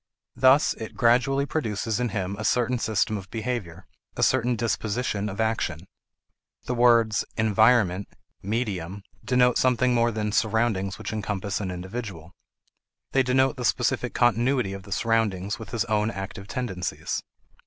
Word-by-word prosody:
Thus 130 +3 +5
it 110 - -8
gradually 130 +4 +3
produces 115 -6 -2
in 125 -1 0
him 95 -1 -3
a - - -3
certain 125 +3 +1
system 110 -1 0
of 95 0 -12
behavior, 110 -7 -4 0.3
a - - +1
certain 125 -1 +2
disposition 110 -1 -1
of 100 - -7
action. 110 -8 -1 0.8
The 125 - -3
words 115 -3 +4
"environment," 110 -3 +3 0.3
"medium" 100 -3 -3 0.2
denote 125 -1 +3
something 125 0 +2
more 120 0 +3
than 105 -2 -2
surroundings 110 -3 0
which - - -6
encompass 105 -2 -3
an 95 - -3
individual. 90 -2 -6 0.8
They 135 - +3
denote 130 +2 +2
the 125 - -4
specific 125 +1 0
continuity 120 -2 +2
of 100 - -7
the 100 +1 -14
surroundings 105 -2 0
with 115 - -9
his 115 -1 -1
own 105 -1 +1
active 100 -1 -7
tendencies. 100 -7 -3
110 Hz, 145 wpm, -25 LUFS, 100-125 Hz, 0.8 s, Thus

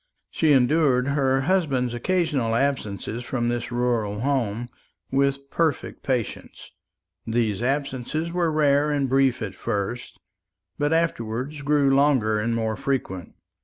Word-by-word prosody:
She 160 -2 +2
endured 135 -1 +3
her 135 -2 +2
husband's 135 -7 +1
occasional 140 -4 0
absence 120 -6 -1 0.2
from 120 -1 -1
this 120 0 -3
rural 115 -4 0
home 120 -4 -1 0.4
with 140 0 0
perfect 165 -3 -1
patience. 125 -5 -4 0.6
These 110 -3 0
absences 140 +4 -2
were 170 -2 +1
rare 145 -1 +3
and 145 -2 +1
brief 130 -2 +2
at 100 -3 -4
first, 100 +5 -4 0.6
but 145 +1 +1
afterwards 145 -3 -1
grew 145 -1 +3
longer 130 -7 +3
and 115 +2 0
more 110 -1 -1
frequent. 100 -11 -3
135 Hz, 125 wpm, -24 LUFS, 120-145 Hz, 0.6 s, endured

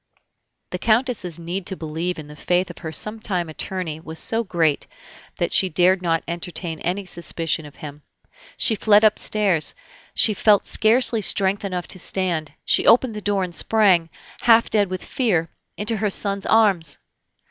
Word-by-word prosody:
The - - -4
Countess's 220 -7 0
need 175 +2 -5
to 190 - -2
believe 165 +3 -4
in 155 -2 -9
the 150 - -12
faith 180 +4 0
of - - -14
her 160 -2 -6
sometime 200 -2 -3
attorney 160 -1 -4
was 160 0 -9
so 225 +7 0
great, 165 -7 0 0.5
that - - -2
she 190 - +3
dared 180 +3 +3
not 165 -2 0
entertain 170 -1 -6
any 190 +3 -3
suspicion 165 -3 -3
of 145 - -16
him. 150 -1 -10 0.6
She 230 - +3
fled 210 0 +4
upstairs; 210 -5 +1 0.4
she 215 - +4
felt 205 0 +3
scarcely 230 0 +3
strength 195 +1 +2
enough 180 -4 -4
to 185 - -2
stand; 175 -4 -2
she - - +2
opened 245 0 +5
the 210 - -6
door, 200 -1 0
and 180 -1 -5
sprang, 185 -4 +3 0.3
half 230 -1 +4
dead 205 -3 +3
with 185 0 -5
fear, 175 -11 0 0.3
into 215 +2 -1
her 210 0 0
son's 200 0 -1
arms. 205 -7 +3
185 Hz, 165 wpm, -22 LUFS, 165-210 Hz, 0.6 s, opened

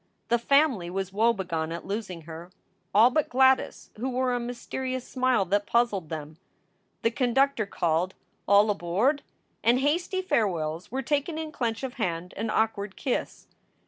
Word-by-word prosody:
The 235 - +3
family 265 - +3
was 190 +1 -3
woebegone 190 -7 0
at 170 - -6
losing 195 -4 -4
her 165 +2 -9 0.4
all 225 +5 +6
but 310 +2 +1
Gladys, 265 +1 +2
who 250 +5 -2
wore 255 0 0
a 245 - 0
mysterious 255 +1 -4
smile 255 -6 +1
that 205 +3 0
puzzled 210 -9 +1
them. 155 -1 -6 0.7
The 230 - +3
conductor 250 -2 +1
called, 175 +1 0 0.3
"All 205 +2 +5
aboard!" 205 - +1 0.4
and 240 +2 +4
hasty 345 +7 0
farewells 175 - -1
were 265 +2 -2
taken 290 +4 -1
in 315 -1 -4
clench 230 -3 -2
of 260 -2 -3
hand 175 -2 -2
and 225 - -3
awkward 210 -2 0
kiss. 255 - -3
225 Hz, 150 wpm, -27 LUFS, 185-260 Hz, 0.7 s, all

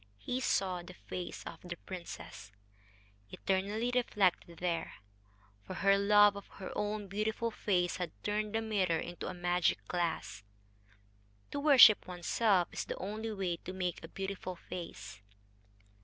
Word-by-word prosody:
He 250 - -3
saw 185 -8 +1
the 180 +1 -11
face 180 0 -6
of - - -8
the 175 -1 -6
princess 95 - -8 0.8
eternally 200 - -1
reflected 195 -8 +1
there; 170 -1 -2 0.7
for 185 - -8
her 195 +1 +4
love 205 0 +6
of 200 - -8
her 190 - -7
own 210 0 -2
beautiful 215 +3 -1
face 180 -5 0
had 180 -2 -2
turned 210 +1 -1
the 225 - +1
mirror 190 -6 +1
into 175 +2 -5
a 185 - -5
magic 175 0 +2
glass. 170 -9 -2 1.1
To 285 - -2
worship 275 -7 +8
oneself 180 +1 +2
is - - -3
the - - -5
only 215 +3 -4
way 190 -4 -2
to 185 - -8
make 180 -3 -3
a - - -6
beautiful 190 0 -5
face. 165 - -8
190 Hz, 140 wpm, -33 LUFS, 175-210 Hz, 1.1 s, worship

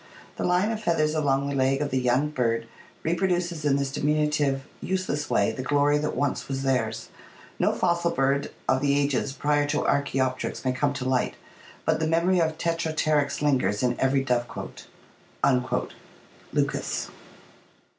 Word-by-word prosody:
The - - -4
line 180 +5 +2
of 220 -1 -3
feathers 155 -5 +1
along 140 -3 +1
the 140 - -2
leg 135 0 +2
of 145 -1 -2
the 130 - +1
young 125 +4 +2
bird 115 -5 0 0.4
reproduces 175 -2 0
in 140 -2 +3
this 140 -1 -1
diminutive, 150 -2 +1 0.2
useless 185 -6 -2
way - - +2
the 130 - -5
glory 145 +2 +2
that 150 - -2
once 145 -2 -1
was 135 0 -3
theirs. 115 -4 -1 0.5
No - - +3
fossil 170 -1 +1
bird 140 -2 +1 0.2
of 130 0 +2
the 140 0 +2
ages 140 -1 0
prior 145 +1 +1
to - - 0
Arckteopteryx 135 -2 0
may 130 - +2
come 140 +3 0
to 130 - -4
light, 130 -1 +1 0.5
but - - +2
the 160 - 0
memory 170 +3 +2
of 160 -1 0
Tetrapteryx 155 -4 0
lingers 130 -7 +1
in 125 -1 +2
every 135 0 +2
dove 125 -2 0
cote" - - -8 1.6
(Lucas). - - -1
145 Hz, 155 wpm, -26 LUFS, 135-155 Hz, 1.6 s, in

